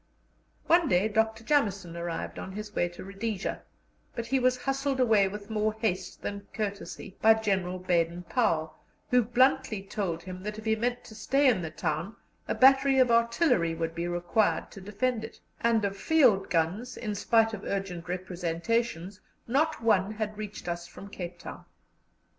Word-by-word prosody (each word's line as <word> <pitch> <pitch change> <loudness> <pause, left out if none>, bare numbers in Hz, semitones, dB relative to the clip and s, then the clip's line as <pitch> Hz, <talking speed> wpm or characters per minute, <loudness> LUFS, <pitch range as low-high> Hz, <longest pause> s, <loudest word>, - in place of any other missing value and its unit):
One 340 -1 +4
day 185 -1 +3
Dr. 220 +1 0
Jameson 200 - 0
arrived 170 -1 -4
on 190 - -7
his 210 +1 -7
way 175 - +1
to 175 - -10
Rhodesia, 195 +1 -4 0.5
but 235 - -3
he 265 +3 +1
was 255 0 +2
hustled 270 0 -1
away 220 -6 +4
with 205 +2 -8
more 215 0 +1
haste 190 -4 -3
than 200 0 -5
courtesy 200 -2 -5
by 220 0 +7
General 190 -4 -1
Baden 175 -1 0
Powell, 160 -2 0 0.4
who 250 0 +6
bluntly 245 -2 +2
told 185 -4 -3
him 185 0 -8
that 210 +2 -5
if 220 - -9
he 220 0 +2
meant 245 +2 -2
to 220 - -12
stay 275 +6 +2
in 235 -8 +3
the 160 - -4
town 155 +6 -3 0.3
a - - -1
battery 270 +1 +5
of 255 -2 +5
artillery 235 - +3
would 165 0 -3
be 170 +1 -3
required 175 +5 0
to 195 - -10
defend 220 +4 -1
it; 225 - -9 0.2
and 230 -2 +2
of 200 0 -2
field 230 -5 +3
guns, 185 +10 -1
in 215 -3 -3
spite 225 +2 +2
of 210 -2 -6
urgent 185 -4 -4
representations, 185 +2 -2 0.3
not 300 +2 +1
one 210 -2 +3
had 215 0 -3
reached 210 -2 -7
us 175 0 -3
from 200 +3 -11
Cape 175 -2 -6
Town. - - -9
210 Hz, 170 wpm, -28 LUFS, 180-235 Hz, 0.5 s, by